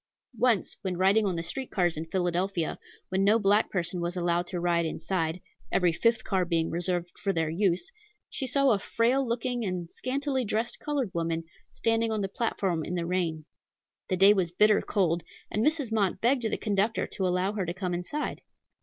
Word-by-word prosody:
Once 235 -6 +2
when 185 -2 -3
riding 200 +3 +4
on 185 - -1
the 165 - -2
street 260 +10 -5
cars 175 -4 +1
in 160 +2 -5
Philadelphia, 175 0 -1 0.3
when 190 +1 +1
no 210 +3 +5
black 205 0 +3
person 180 -1 -1
was 175 +1 -2
allowed 175 0 0
to 180 - -3
ride 170 -1 +2
inside, 165 +1 -2 0.3
every 175 -2 +3
fifth 230 +6 +2
car 190 -2 +1
being 165 -2 0
reserved 175 0 -1
for 200 - 0
their 165 -3 0
use, 185 - 0 0.4
she 265 - -3
saw 275 +1 +3
a 205 - +2
frail 240 +6 +1
looking 245 0 -1
and 180 -4 -3
scantily 270 0 -1
dressed 225 +2 -2
colored 280 -9 -2
woman, 165 -1 -1 0.3
standing 225 0 0
on 215 -1 -1
the 195 - 0
platform 190 -5 -1
in 180 - -4
the 170 -1 -1
rain. 165 -3 -1 0.6
The 185 - +1
day 195 +3 +8
was 185 -4 +1
bitter 210 +4 +4
cold, 175 -4 +1 0.3
and 215 - 0
Mrs. 300 -5 +1
Mott 200 -4 +1
begged 250 +4 +2
the 225 - 0
conductor 210 +1 0
to 190 - -2
allow 180 +3 0
her 205 -3 -1
to - - -1
come 180 0 -3
inside. 180 +13 -3
190 Hz, 190 wpm, -28 LUFS, 175-225 Hz, 0.6 s, day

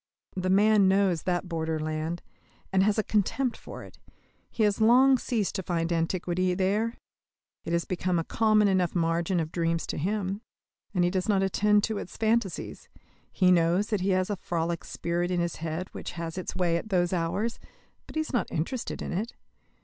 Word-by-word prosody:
The 185 0 -1
man 205 +1 +5
knows 190 -4 +3
that 180 0 -1
borderland, 160 0 -2 0.5
and 190 - +4
has 205 +2 +2
a 215 - +2
contempt 225 +5 0
for - - -10
it: - - -14 0.5
he 225 - -1
has 210 +1 +2
long 255 +4 +6
ceased 225 -6 -1
to 190 - -2
find 170 -1 -1
antiquity 180 +2 0
there. 210 +5 0 0.7
It 170 - -2
has 170 0 +1
become 180 -1 -1
a 165 - 0
common 215 +2 +3
enough 185 -3 +1
margin 170 +1 +1
of 160 -1 -3
dreams 165 -1 0
to - - -4
him; 195 +3 -2 0.5
and 180 - +3
he 175 - +2
does 185 +2 -1
not 195 -2 +3
attend 205 +2 +3
to 220 -2 -1
its - - -8
phantasies. 220 -5 -1 0.4
He 185 -2 +3
knows 175 +4 +3
that 210 -4 0
he 190 - 0
has 185 +1 +1
a 205 - -2
frolic 170 -1 -2
spirit 175 +1 -2
in 180 -1 0
his 170 -1 -2
head 165 +3 -4
which - - -7
has 165 -1 -5
its 185 - -5
way 175 -2 +1
at 215 - -6
those 180 -2 +1
hours, 185 +7 -1 0.5
but - - -12
he 315 - +1
is 310 - -6
not 245 - 0
interested 195 +11 -3
in - - -4
it. 215 +7 -3
185 Hz, 190 wpm, -28 LUFS, 170-210 Hz, 0.7 s, long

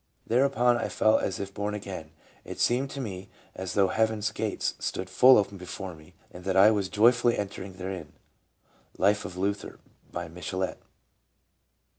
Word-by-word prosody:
" - - -42
Thereupon 125 -1 +3
I - - -2
felt 110 0 +3
as 95 - -2
if 100 0 -5
born 105 +1 -2
again, 100 -5 -6 0.4
and - - -10
it - - -14
seemed 130 +3 +2
to 140 - -7
me 95 -7 -6 0.2
as 95 -1 -5
though 100 -2 +4
heavens' 110 -1 +1
gates 110 -1 -2
stood 95 0 -4
full 130 +7 +7
open 100 -1 0
before 90 +1 -6
me, 75 -1 -17 0.2
and 90 - -11
that 95 0 0
I 100 +3 +8
was 100 -3 0
joyfully 120 +2 +4
entering 100 -1 -5
therein." 95 -3 -6 0.4
— - - -45 0.3
Life 105 +2 +2
of 90 - -7
Luther, 100 +2 -2 0.3
by 85 0 -4
Michelet. 90 +2 -4
100 Hz, 175 wpm, -28 LUFS, 95-110 Hz, 0.4 s, I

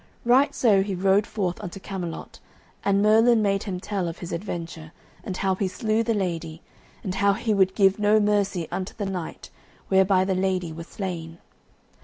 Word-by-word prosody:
Right 255 +4 +4
so 210 -6 +4
he 195 0 -2
rode 195 +3 +2
forth 185 -4 -3
unto 195 -1 -7
Camelot, 185 -4 -6 0.4
and 200 0 +2
Merlin 225 +1 +5
made 195 -1 +1
him 190 -4 -4
tell 195 -2 -3
of 165 0 -5
his 175 - -7
adventure, 170 -3 -6 0.3
and 185 - -5
how 190 -1 +1
he 190 +1 -1
slew 220 +3 0
the 230 0 0
lady, 170 -4 -3 0.4
and 185 - -3
how 200 +1 +3
he 220 +2 -1
would 190 -2 +2
give 195 -1 +3
no 210 +1 +4
mercy 205 -4 +1
unto 185 0 -4
the 205 - -3
knight, 185 -4 -6 0.4
whereby 190 -1 +4
the 190 - 0
lady 185 -3 -1
was 165 +1 -8
slain. 170 -4 -6
195 Hz, 180 wpm, -25 LUFS, 180-205 Hz, 0.4 s, Merlin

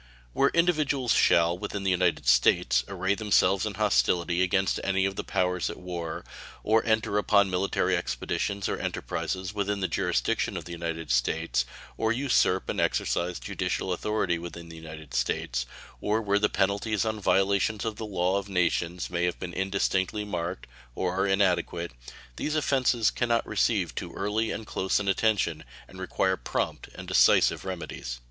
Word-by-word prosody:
Where 140 - +3
individuals 150 -7 +2
shall, 85 0 +4
within 100 +2 -5
the 95 - +2
United 90 -6 +1
States, - - +4
array 95 0 0
themselves 100 -2 +2
in - - -5
hostility 85 0 +2
against 95 +1 +1
any 95 0 +1
of 95 0 -2
the - - -3
powers 90 -1 0
at 85 - -6
war, 85 -3 -5 0.4
or 110 +1 +3
enter 110 -2 +2
upon 100 -2 +3
military 90 +2 +1
expeditions 100 -1 -2
or - - -2
enterprises 95 +1 -3
within 100 -1 -1
the 95 - 0
jurisdiction 95 +4 0
of 85 - -6
the 85 - -9
United 85 -3 -4
States, 60 +2 +1 0.3
or 110 0 +1
usurp 120 -7 +2
and - - -1
exercise 90 0 0
judicial 95 - -2
authority 90 -2 -1
within 85 0 -8
the 85 - -10
United 80 -2 -10
States, - - -1 0.3
or 105 +2 +1
where 100 -2 +1
the 105 - +2
penalties 100 +3 0
on 110 -1 -2
violations 100 +2 +1
of 110 -2 -3
the - - -5
law 95 0 +1
of 100 0 -9
nations 90 -1 0
may 90 0 0
have 90 - -1
been 90 -1 -6
indistinctly 95 +1 0
marked, 90 -2 -4 0.3
or 90 -1 -1
are 95 +1 +1
inadequate 90 -3 +1 0.5
these 155 - -2
offenses 130 -6 +2
can 120 - -1
not 115 0 +2
receive - - +1
too - - -5
early 105 +3 -1
and 110 - -4
close 95 -1 0
an 100 - -4
attention, 100 -5 +1 0.2
and 95 - -13
require 95 0 0
prompt - - -3
and - - -9
decisive - - +4
remedies. 85 -9 -5
95 Hz, 165 wpm, -27 LUFS, 85-105 Hz, 0.5 s, shall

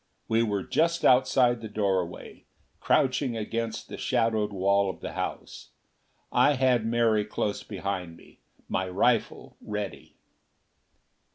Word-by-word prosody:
We 115 +1 +2
were 105 -4 -1
just 170 +1 +1
outside 125 -2 +4
the 110 - -6
doorway, 95 -4 -3 0.3
crouching 130 -2 +1
against 115 +1 -3
the - - -8
shadowed 115 -4 0
wall 100 0 +2
of 90 - -6
the - - -6
house. - - -6 0.6
I 145 - +4
had 125 -4 +2
Mary 115 -2 +2
close 105 0 -3
behind 95 -5 -5
me, - - -19 0.3
my 95 0 -2
rifle 110 +5 0
ready. 105 -2 -6
110 Hz, 120 wpm, -27 LUFS, 100-120 Hz, 0.6 s, outside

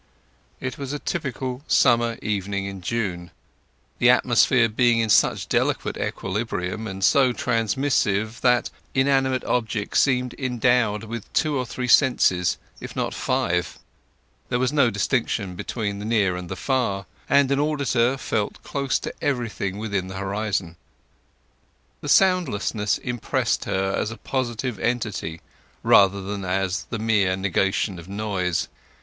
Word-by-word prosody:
It 130 +1 -5
was 140 0 -4
a - - -1
typical 130 -5 -4
summer 120 -1 +3
evening 100 -1 -2
in 100 -1 -6
June, 90 -4 -3 0.7
the - - +5
atmosphere 115 - +4
being 120 +1 +3
in 115 -1 +1
such - - +3
delicate - - 0
equilibrium 100 0 -3
and 95 -1 -6
so 130 +1 +4
transmissive 110 -2 0
that 125 -1 +3 0.2
inanimate 130 -1 +2
objects 110 -4 0
seemed 125 -3 +2
endowed 125 -4 +1
with 115 -1 -7
two 155 -2 +1
or 130 -2 -1
three 125 +1 -4
senses, 105 -10 +4 0.2
if - - -8
not - - -2
five. 90 0 -1 0.7
There 125 - +1
was 130 +3 0
no 140 -5 +4
distinction 100 -2 -1
between 100 +2 -4
the 105 - -6
near 105 -5 +2
and 90 -1 -6
the 95 - -4
far, 110 -6 -1 0.2
and 140 -1 +4
an 140 - +2
auditor 135 -4 +1
felt 105 -5 -3
close 140 -2 -1
to - - -6
everything 115 -8 -2
within 100 -4 -2
the 95 - -7
horizon. 95 -3 -2 1.2
The - - -5
soundlessness 125 - +2
impressed 120 -2 -1
her 95 0 -1
as - - -1
a 115 - -8
positive 125 -3 -3
entity 105 -8 -2 0.4
rather 100 0 +5
than 100 0 -4
as 95 0 -1
the 115 - -3
mere 105 -4 +2
negation 95 0 0
of 85 +2 -12
noise. 100 -4 -1
110 Hz, 140 wpm, -23 LUFS, 95-125 Hz, 1.2 s, the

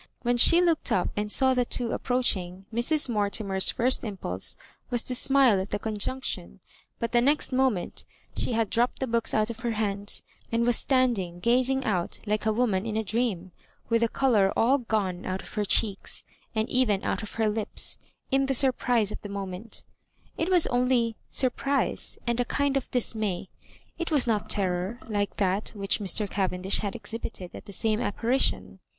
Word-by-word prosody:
When 245 0 +2
she 335 +8 +6
looked 335 -3 +1
up 180 - +2
and 210 0 -2
saw 265 +2 +4
the 250 -1 +2
two 240 -1 -1
approach 250 -2 +2
ing, 180 +1 -8
Mrs. 290 +7 +1
Mortimer's 200 -3 0
first 255 +2 +2
impulse 180 - -1 0.3
was 240 -1 +1
to 255 - +1
smile 255 -5 +5
at 190 - -6
the 205 - -1
conjunction; 210 - -4 0.4
but 230 - -3
the 240 - +4
next 285 +4 +2
moment 255 -8 0 0.3
she - - -1
had 225 -2 0
dropped 240 +2 +1
the 265 - -1
books 230 -2 +1
out 215 +1 +2
of 230 - -10
her 235 -2 -2
hands, 205 -2 -2 0.3
and 230 0 +1
was 240 -1 +3
standing 235 -11 +1
gazing 255 +6 +2
out 180 -6 -1
like 210 0 -1
a - - +4
woman 215 -3 0
in 220 -1 -2
a 220 - 0
dream, 205 -4 -2 0.4
with 230 0 +2
the 230 - +2
colour 220 -8 +3
all 260 +5 +4
gone 200 -6 -2
out 185 0 -3
of - - -13
her 210 -1 -1
cheeks, 200 0 +1 0.3
and 220 +1 +1
even 225 -6 +2
out - - -1
of 215 - -8
her 225 -1 +1
lips, 210 0 -1 0.3
in 270 0 +2
the 270 - +1
surprise 245 -5 +2
of - - -6
the 205 - -8
mo 200 0 -4
ment 190 +4 -6 0.5
It 330 - -1
was 360 -3 +5
only 245 -2 +1
surprise 275 +2 0
and 235 0 0
a 245 - +2
kind 285 +2 0
of 275 - -1
dis 245 -3 +1
may; 200 -4 -3 0.5
it 340 - -2
was 295 -5 +3
not 220 -3 0
terror, 185 +2 0
like 205 -2 -2
that 195 +1 0
which 200 +1 0
Mr. 205 +1 0
Cavendish 190 -1 0
had 200 -2 -3
exhibited 220 -4 -6
at - - -10
the - - -10
same 215 +2 0
apparition. 245 +3 -1
225 Hz, 190 wpm, -27 LUFS, 200-250 Hz, 0.5 s, she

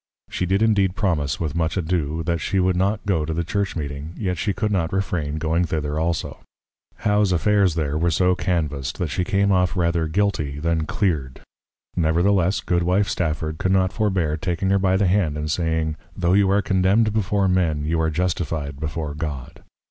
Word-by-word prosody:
She 90 - -2
did 95 +4 +2
indeed 100 -4 +2
promise, 80 - 0
with 80 -4 -2
much 80 +2 -1
ado, 80 -3 -1
that 85 +1 -1
she 95 - 0
would 90 0 +2
not 100 +4 0
go 90 -6 +1
to 80 +1 -3
the 85 - 0
Church 100 +4 -2
meeting, 75 +1 -5
yet 95 -5 -1
she 105 - 0
could 105 +2 -1
not 85 -5 0
refrain 85 -6 -2
going 80 +2 +1
thither 75 -2 -2
also. 85 0 -2 0.6
How's 105 -2 +1
Affairs 95 +1 +2
there 75 -2 -1
were 85 +1 +2
so 90 +2 +3
canvased, 75 -8 -2
that 85 - -2
she 90 - 0
came 100 +2 +1
off 90 -3 +2
rather 85 -2 +1
Guilty 80 -6 -1
than 80 0 -1
Cleared; 75 - -1 0.5
nevertheless 90 +4 +2
Goodwife 90 +3 +1
Stafford 80 -3 -2
could 95 - 0
not 95 -1 +2
forbear 95 -8 0
taking 90 +3 -1
her 100 - +3
by 95 0 +2
the 100 - +2
Hand, 90 -5 +1
and 75 0 -2
saying, 80 -1 -1 0.2
_Tho' 90 +1 +3
you 100 -1 +4
are 100 +1 +2
Condemned 100 +3 +2
before 100 -2 +1
Men, 85 -5 +1
you 80 +1 0
are 80 - +1
Justify'd 80 -4 -2
before 75 0 -4
God. 75 -4 -6
85 Hz, 185 wpm, -22 LUFS, 80-95 Hz, 0.6 s, you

